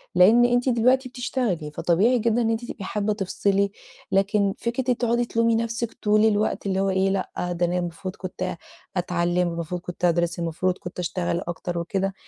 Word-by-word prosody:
لإن 220 +7 +7
أنتِ 245 +1 +2
دلوقتي 255 +2 +3
بتشتغلي، 235 - -2
فطبيعي 200 +11 +2
جدًا 230 +1 +2
إن 225 - +1
أنتِ 225 +1 -1
تبقي 215 - -7
حابّة 210 +2 -1
تفصلي، 200 0 0 0.4
لكن 195 0 +2
فكرة 235 +2 -3
إنِّك 260 0 -1
أنتِ 250 - +1
تقعدي 240 0 +2
تلومي 230 0 +2
نفسِك 230 0 -2
طول 210 +1 +4
الوقت، 210 -1 +1
اللي 190 -1 0
هو 195 - +1
إيه 190 0 +2
لأ، 190 -1 -2 0.2
ده 175 0 +1
أنا 175 +1 0
المفروض 180 +1 -4
كنت 185 -1 -5 0.4
أتعلّم، 175 0 +1
المفروض 170 +1 -4
كنت 180 0 -3
أدرس، 170 0 +1
المفروض 170 +2 -1
كنت 175 0 -8
أشتغل 175 -1 -1
أكتر. 175 0 -4
وكده 195 +3 -1
195 Hz, 180 wpm, -24 LUFS, 175-230 Hz, 0.4 s, لإن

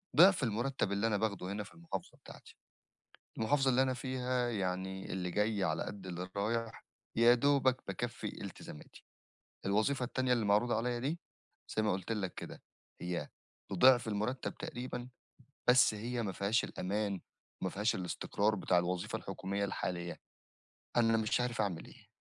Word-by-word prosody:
ضِعف 185 0 +7
المُرتّب 120 -1 0
اللي 100 +3 +1
أنا 105 -2 +2
باخده 100 -3 -1
هنا 105 +1 -3
في 100 - -14
المحافظة 165 - -6
بتاعتي، - - -14 0.8
والمحافظة 135 +4 +3
اللي 130 +1 +4
أنا 130 -1 +1
فيها 125 -1 -1
يعني 95 -2 -2
اللي 90 -1 -2
جاي 105 +1 +1
على 80 -2 0
قد 100 -2 -7
اللي 90 0 -4
رايح، 115 +2 -1 0.3
يا 120 +1 +7
دوبك 130 0 +3
بيكّفي 95 - -4
التزاماتي، 75 - -10 0.6
الوظيفة 110 +7 +2
التانية 130 0 0
اللي 120 -3 +2
معروضة 105 +4 +3
عليَّ 120 +1 -1
دي 150 +7 -2 0.6
زي 110 - +3
ما 105 - +2
قُلت 95 +4 -2
لك 100 -4 -2
كده، - - -8 0.4
هي 90 0 -3 0.4
بضِعف 120 +4 +6
المُرتّب 110 +5 -2
تقريبًا، 125 0 -5 0.6
بس 125 -3 +7
هي 120 +3 -2
ما 100 -4 -2
فيهاش 100 +6 +1
الأمان 100 0 -2 0.4
وما 95 - -1
فيهاش 105 +5 +1
الاستقرار 100 +3 0
بتاع 90 -2 +2
الوظيفة 90 +1 -1
الحكومية 100 +1 -3
الحالية، 85 -3 -3 0.8
أنا 115 -1 +5
مش 110 +2 +1
عارف 125 -2 -1
أعمل 100 -6 -1
إيه، - - -16
110 Hz, 150 wpm, -34 LUFS, 95-125 Hz, 0.8 s, ضِعف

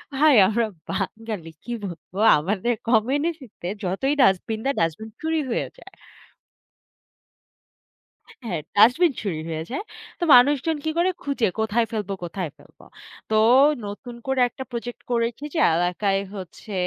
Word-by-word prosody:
ভাই 295 -1 +5
আমরা 225 +2 +1 0.3
বাঙালি 205 -4 -4
কি 240 - -7
বলবো? 175 +1 -9 0.2
আমাদের 205 +8 -1 0.2
কমিউনিটিতে 260 - 0 0.2
যতই 195 +11 0
dustbin 215 0 +2
দেয়, 275 - +1
dustbin 165 +7 -2
চুরি 320 0 0
হয়ে - - -1
যায়। - - -15 2.5
হ্যাঁ, 175 -8 -3 0.2
Dustbin 255 - +5
চুরি 180 -7 -2
হয়ে 160 -1 -3
যায়। 280 - -3 0.4
তো - - +1
মানুষজন 285 +5 +4
কি 315 - 0
করে? 365 +2 +3
খুঁজে 275 -5 0
কোথায় 220 +2 +1
ফেলবো, 205 -3 -3
কোথায় 175 -1 -4
ফেলব? 145 - -22 0.5
তো - - +1 0.5
নতুন 235 +4 -8
করে 265 -1 0
একটা 265 - -9
project 240 0 -6
করেছি 235 +3 -1
যে - - -1 0.2
এলাকায় 185 +3 +1 0.2
হচ্ছে 190 +3 -9
225 Hz, 130 wpm, -23 LUFS, 195-270 Hz, 2.5 s, ভাই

